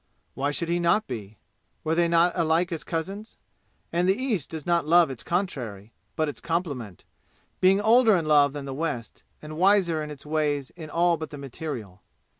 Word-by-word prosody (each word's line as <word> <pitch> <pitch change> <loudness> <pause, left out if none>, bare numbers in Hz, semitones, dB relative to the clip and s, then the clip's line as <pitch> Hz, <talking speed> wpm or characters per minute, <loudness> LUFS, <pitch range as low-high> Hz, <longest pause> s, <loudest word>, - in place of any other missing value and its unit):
Why 140 +2 -1
should 165 +3 -2
he 175 +1 +1
not 175 +6 +2
be? 110 -4 -7 0.5
Were 160 - 0
they 170 +1 +3
not 170 +1 +4
alike 170 +1 +1
as 165 - -4
cousins? 195 +6 -5 0.6
And 175 +2 +2
the 195 - +2
East 225 - -1
does 160 -3 -7
not 170 -3 +1
love 170 -2 +5
its 130 - -7
contrary, 120 - -3 0.2
but 155 - 0
its 145 - -6
complement, 145 - -3 0.6
being 190 +2 +5
older 225 +1 +5
in 170 -3 0
love 145 -2 +4
than 145 -2 -6
the 135 - -5
West, 135 -6 -4 0.2
and 155 0 -7
wiser 185 -4 +3
in 150 - -5
its 150 -1 -9
ways 150 -3 -1
in 160 -3 -10
all 170 +1 +2
but 155 0 -6
the 145 - -8
material. 125 - -7
160 Hz, 190 wpm, -26 LUFS, 145-175 Hz, 0.6 s, love